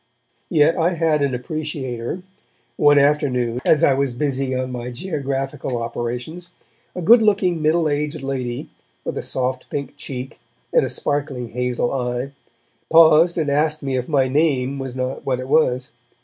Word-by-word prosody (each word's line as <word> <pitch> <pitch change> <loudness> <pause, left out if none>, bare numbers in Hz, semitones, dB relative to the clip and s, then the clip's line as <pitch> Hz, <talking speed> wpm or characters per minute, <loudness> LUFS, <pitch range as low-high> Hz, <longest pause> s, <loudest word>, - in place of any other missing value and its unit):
Yet 155 -1 +4
I 170 +1 +2
had 160 -2 +1
an 140 -3 +1
appreciator. 135 +1 -4 0.5
One 145 -1 +5
afternoon, 130 -4 +2
as 155 - +3
I 140 - +5
was 135 -1 0
busy 135 -1 -1
on 130 0 -2
my 125 0 -5
geographical 135 -3 -3
operations, 120 +8 -4 0.5
a 180 - -4
good 230 +7 +7
looking 195 -6 +2
middle 160 +1 +2
aged 150 0 -2
lady, 130 -3 -4 0.3
with - - -3
a - - -2
soft 130 0 -3
pink 140 -2 -5
cheek 130 -2 -7 0.3
and - - +5
a - - -1
sparkling 140 -4 -3
hazel 125 +1 -1
eye, 125 +1 -2 0.6
paused 165 +1 +6
and 155 -4 0
asked 150 +1 +1
me 135 -1 -1
if 125 +2 -2
my 135 -4 +3
name 140 -2 +1
was 135 -2 -5
not 130 0 -3
what 130 -2 -1
it 130 - -5
was. 135 -3 +2
140 Hz, 160 wpm, -21 LUFS, 125-155 Hz, 0.6 s, good